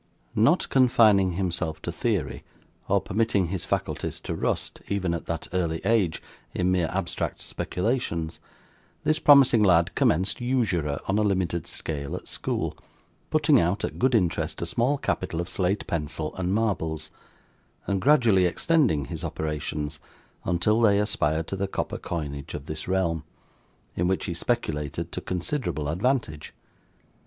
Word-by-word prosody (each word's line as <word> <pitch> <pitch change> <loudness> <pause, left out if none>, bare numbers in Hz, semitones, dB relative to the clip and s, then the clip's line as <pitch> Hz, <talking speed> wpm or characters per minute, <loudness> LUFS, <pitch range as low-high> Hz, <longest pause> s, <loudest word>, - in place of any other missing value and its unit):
Not 140 - +3
confining 110 -8 +5
himself 85 -3 -2
to - - -3
theory, - - -2 0.4
or - - +3
permitting 100 -4 +1
his 95 -1 -3
faculties - - -2
to - - -4
rust, - - -2
even 95 -4 -1
at 85 - -5
that 85 -2 -3
early 85 -3 0
age, 100 -7 +2 0.3
in 90 0 +1
mere 90 -3 +1
abstract 95 -2 -2
speculations, 90 -6 -2 0.6
this 155 0 +2
promising 135 -6 +7
lad 85 -4 +4
commenced 95 +8 +1
usurer 95 - 0
on 100 +2 +2
a - - +3
limited 90 -5 0
scale 75 -4 -4
at - - -7
school; - - -2 0.5
putting 150 -3 +4
out 90 +4 0
at - - -6
good 130 0 +3
interest 90 -7 0
a - - -1
small 130 +5 +1
capital 80 - -2
of 85 - -2
slate 95 +2 -1
pencil 75 -1 -2
and 90 0 -1
marbles, 80 -8 -1 0.7
and 100 -1 -1
gradually 115 -10 +5
extending 110 - +2
his 85 0 -6
operations 75 -1 -3 0.5
until 105 +6 +2
they 105 -3 +5
aspired 80 -6 0
to 95 - -4
the 100 +1 -1
copper - - -3
coinage 70 -4 -5
of 70 - -7
this 75 0 -5
realm, 85 -4 0 0.7
in 90 - +1
which 95 +1 0
he 85 - -2
speculated 85 -5 -2
to - - -4
considerable 90 - -2
advantage. 90 - -1
90 Hz, 145 wpm, -26 LUFS, 80-110 Hz, 0.7 s, promising